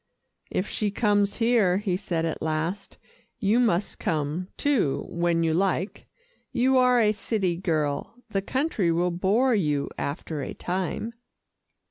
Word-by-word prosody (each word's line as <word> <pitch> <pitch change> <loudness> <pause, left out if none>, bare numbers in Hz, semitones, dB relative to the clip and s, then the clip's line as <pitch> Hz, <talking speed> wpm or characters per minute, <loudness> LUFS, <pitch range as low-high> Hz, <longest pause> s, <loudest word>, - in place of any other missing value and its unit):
"If 185 - -1
she 210 - -1
comes 205 -1 +2
here," 225 -6 +3
he 195 -3 -1
said 175 -4 -2
at 165 - -3
last, 160 +5 -2 0.4
"you 215 +2 +2
must 210 -5 +1
come, 155 +3 -1
too, 260 - +1
when 170 -1 +1
you 160 -1 +2
like. 190 +2 -1 0.4
You 260 +2 +3
are 250 -1 +5
a 215 -2 +4
city 205 -4 -1
girl, 155 -2 -1
the 195 -2 0
country 240 - 0
will 175 +2 +1
bore 205 +9 +2
you 150 -9 0
after 145 +1 -3
a - - -5
time." 185 +5 -3
190 Hz, 140 wpm, -26 LUFS, 165-220 Hz, 0.4 s, are